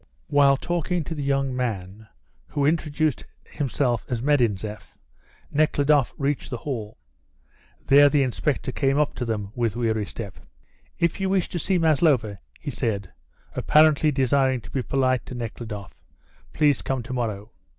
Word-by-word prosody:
While 140 Hz, -1 st, +5 dB
talking 175 Hz, +2 st, -1 dB
to 165 Hz, -, -5 dB
the 150 Hz, -, -5 dB
young 135 Hz, -2 st, 0 dB
man, 110 Hz, -4 st, -4 dB, 0.4 s
who 140 Hz, -, -1 dB
introduced 155 Hz, -1 st, 0 dB, 0.2 s
himself 125 Hz, -4 st, -1 dB
as 120 Hz, -, -1 dB
Medinzeff, 110 Hz, -7 st, 0 dB, 0.5 s
Nekhludoff 145 Hz, -2 st, +2 dB
reached 140 Hz, 0 st, -1 dB
the 125 Hz, -, -3 dB
hall. 115 Hz, -5 st, -5 dB, 0.9 s
There 145 Hz, +1 st, +7 dB
the 145 Hz, -1 st, +3 dB
inspector 130 Hz, +1 st, -1 dB
came 135 Hz, +1 st, +1 dB
up 150 Hz, -1 st, +1 dB
to 125 Hz, -, -4 dB
them 105 Hz, -3 st, -3 dB
with 115 Hz, -3 st, -1 dB
weary 110 Hz, -3 st, 0 dB
step. 100 Hz, -5 st, -8 dB, 0.6 s
"If 170 Hz, +2 st, 0 dB
you 190 Hz, 0 st, 0 dB
wish 190 Hz, -2 st, +1 dB
to 175 Hz, -, -3 dB
see 185 Hz, +4 st, +1 dB
Maslova," 140 Hz, -, +2 dB, 0.2 s
he 145 Hz, -, -5 dB
said, 105 Hz, -7 st, -2 dB, 0.4 s
apparently 155 Hz, 0 st, +4 dB
desiring 130 Hz, -1 st, +2 dB
to 115 Hz, -, -13 dB
be 135 Hz, -, -1 dB
polite 130 Hz, -1 st, +1 dB
to 125 Hz, -, -7 dB
Nekhludoff, 110 Hz, -4 st, -7 dB, 0.5 s
"please 145 Hz, -3 st, +2 dB
come 130 Hz, -2 st, -2 dB
to 125 Hz, +3 st, -6 dB
morrow." 110 Hz, -4 st, -3 dB
135 Hz, 150 wpm, -24 LUFS, 115-150 Hz, 0.9 s, There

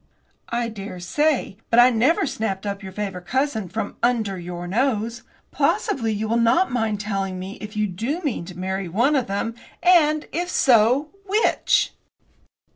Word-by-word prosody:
"I 235 Hz, 0 st, -1 dB
daresay; 210 Hz, -, -1 dB
but 230 Hz, -, +2 dB
I 245 Hz, +1 st, +8 dB
never 255 Hz, +9 st, +3 dB
snapped 210 Hz, -7 st, -3 dB
up 200 Hz, 0 st, -3 dB
your 190 Hz, -1 st, -8 dB
favourite 190 Hz, -3 st, -5 dB
cousin 255 Hz, -6 st, -1 dB
from 220 Hz, +6 st, -4 dB
under 220 Hz, -6 st, +1 dB
your 175 Hz, 0 st, -6 dB
nose. 230 Hz, +3 st, 0 dB, 0.3 s
Possibly 230 Hz, -5 st, 0 dB
you 215 Hz, +1 st, -2 dB
will 230 Hz, +2 st, +1 dB
not 235 Hz, +11 st, +3 dB
mind 225 Hz, -4 st, 0 dB
telling 195 Hz, -3 st, -2 dB
me 190 Hz, +2 st, -7 dB
if 210 Hz, 0 st, -7 dB
you 210 Hz, -, +2 dB
do 225 Hz, -, -3 dB
mean 285 Hz, -, -2 dB
to 175 Hz, 0 st, -10 dB
marry 190 Hz, 0 st, -3 dB
one 240 Hz, -, +2 dB
of 260 Hz, -4 st, +1 dB
them, 200 Hz, +4 st, -2 dB, 0.3 s
and, 310 Hz, -4 st, +4 dB
if 350 Hz, +1 st, -2 dB
so, 255 Hz, +1 st, +4 dB, 0.2 s
which." 420 Hz, +4 st, +2 dB
220 Hz, 160 wpm, -23 LUFS, 195-260 Hz, 0.3 s, I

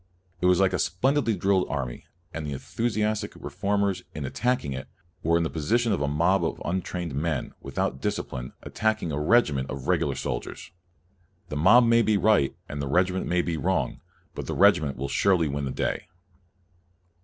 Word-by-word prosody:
It 90 Hz, -, +3 dB
was 90 Hz, 0 st, +4 dB
like 95 Hz, -1 st, +3 dB
a -, -, 0 dB
splendidly 120 Hz, -, +1 dB
drilled 95 Hz, -1 st, +2 dB
army, 65 Hz, -4 st, -4 dB, 0.3 s
and 80 Hz, -, -4 dB
the 75 Hz, -1 st, -4 dB
enthu 115 Hz, -, -3 dB
siastic 105 Hz, -2 st, -1 dB
reformers, 100 Hz, 0 st, -1 dB
in 75 Hz, -2 st, -4 dB
attacking 120 Hz, -, -1 dB
it, 65 Hz, 0 st, -6 dB, 0.3 s
were 85 Hz, +1 st, +3 dB
in 85 Hz, -, +1 dB
the 80 Hz, -, -1 dB
position 115 Hz, +9 st, +1 dB
of 100 Hz, -, 0 dB
a 75 Hz, -, +1 dB
mob 85 Hz, +7 st, +2 dB
of -, -, -2 dB
untrained 90 Hz, -2 st, -3 dB
men, 75 Hz, +1 st, -2 dB
without 65 Hz, -, -2 dB
discipline, 60 Hz, 0 st, -3 dB
attacking 110 Hz, -6 st, -1 dB
a 75 Hz, -, -2 dB
regiment 75 Hz, -, +3 dB
of 65 Hz, 0 st, -6 dB
regular -, -, +1 dB
soldiers, -, -, -5 dB, 0.8 s
The -, -, -4 dB
mob 95 Hz, +11 st, +6 dB
may 115 Hz, 0 st, +5 dB
be 110 Hz, -1 st, +2 dB
io -, -, +2 dB
4 -, -, -5 dB
CALVIN 110 Hz, -, +6 dB
right -, -, -7 dB
and 70 Hz, 0 st, -5 dB
the 70 Hz, -, -3 dB
regiment 90 Hz, +5 st, +1 dB
may 90 Hz, 0 st, +1 dB
be 85 Hz, -2 st, -2 dB
wrong, 70 Hz, -, -1 dB, 0.3 s
but -, -, -6 dB
the -, -, -3 dB
regiment 70 Hz, -3 st, +4 dB
will 70 Hz, +2 st, -3 dB
surely 85 Hz, +3 st, +2 dB
win 70 Hz, 0 st, -2 dB
the 65 Hz, -, -3 dB
day. -, -, -2 dB
85 Hz, 190 wpm, -26 LUFS, 70-105 Hz, 0.8 s, mob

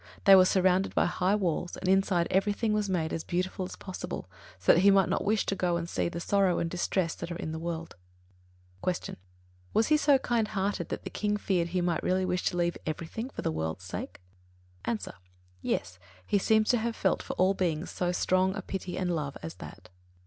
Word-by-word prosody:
They 195 Hz, -, +9 dB
were 185 Hz, -1 st, +7 dB
surrounded 185 Hz, 0 st, +2 dB
by -, -, +4 dB
high 185 Hz, +3 st, +1 dB
walls, 175 Hz, -3 st, -1 dB
and 185 Hz, -, -5 dB
inside 190 Hz, -2 st, +3 dB
everything 205 Hz, +3 st, +1 dB
was 210 Hz, -1 st, 0 dB
made 165 Hz, -4 st, -1 dB
as 160 Hz, -, -3 dB
beautiful 185 Hz, +1 st, -2 dB
as -, -, -9 dB
possible, 185 Hz, -, -6 dB, 0.3 s
so 90 Hz, -, +5 dB
that -, -, +4 dB
he 200 Hz, +2 st, +6 dB
might 195 Hz, -1 st, +4 dB
not -, -, 0 dB
wish 215 Hz, +1 st, +1 dB
to 195 Hz, -, -1 dB
go 175 Hz, -2 st, +1 dB
and 170 Hz, 0 st, -4 dB
see 170 Hz, -, -1 dB
the 170 Hz, -, -5 dB
sorrow 195 Hz, 0 st, +2 dB
and 170 Hz, -, 0 dB
distress 175 Hz, 0 st, -1 dB
that 170 Hz, 0 st, -7 dB
are -, -, -3 dB
in 170 Hz, -3 st, -4 dB
the 160 Hz, -, -4 dB
world. 165 Hz, 0 st, -4 dB, 0.9 s
39. 185 Hz, -, +2 dB
Q. -, -, -7 dB, 0.6 s
Was 220 Hz, -, +4 dB
he 305 Hz, -, +5 dB
so 290 Hz, -2 st, +5 dB
kind 235 Hz, -4 st, 0 dB
hearted 195 Hz, -4 st, -2 dB
that -, -, -4 dB
the -, -, -6 dB
King 210 Hz, 0 st, 0 dB
feared 180 Hz, -4 st, 0 dB
he 180 Hz, +1 st, -1 dB
might 175 Hz, -2 st, 0 dB
really 185 Hz, 0 st, +1 dB
wish 180 Hz, 0 st, 0 dB
to 175 Hz, -, 0 dB
leave 175 Hz, 0 st, 0 dB
everything 170 Hz, -, -4 dB
for -, -, -7 dB
the -, -, 0 dB
world's 80 Hz, +3 st, -3 dB
sake? 90 Hz, -, -6 dB, 0.7 s
A. 120 Hz, -2 st, 0 dB, 0.6 s
Yes; 90 Hz, +1 st, -2 dB, 0.3 s
he 205 Hz, -, +2 dB
seems 220 Hz, +2 st, +3 dB
to 245 Hz, -, +4 dB
have 230 Hz, +1 st, -2 dB
felt 190 Hz, -, +1 dB
for -, -, -5 dB
all 185 Hz, +2 st, +3 dB
beings 175 Hz, -3 st, -1 dB
so 180 Hz, -1 st, -1 dB
strong 185 Hz, +1 st, +2 dB
a 195 Hz, -, -5 dB
pity 185 Hz, -1 st, -5 dB
and 180 Hz, -2 st, 0 dB
love 145 Hz, -3 st, -3 dB
as 80 Hz, 0 st, -5 dB
that. -, -, -11 dB
185 Hz, 220 wpm, -29 LUFS, 170-195 Hz, 0.9 s, They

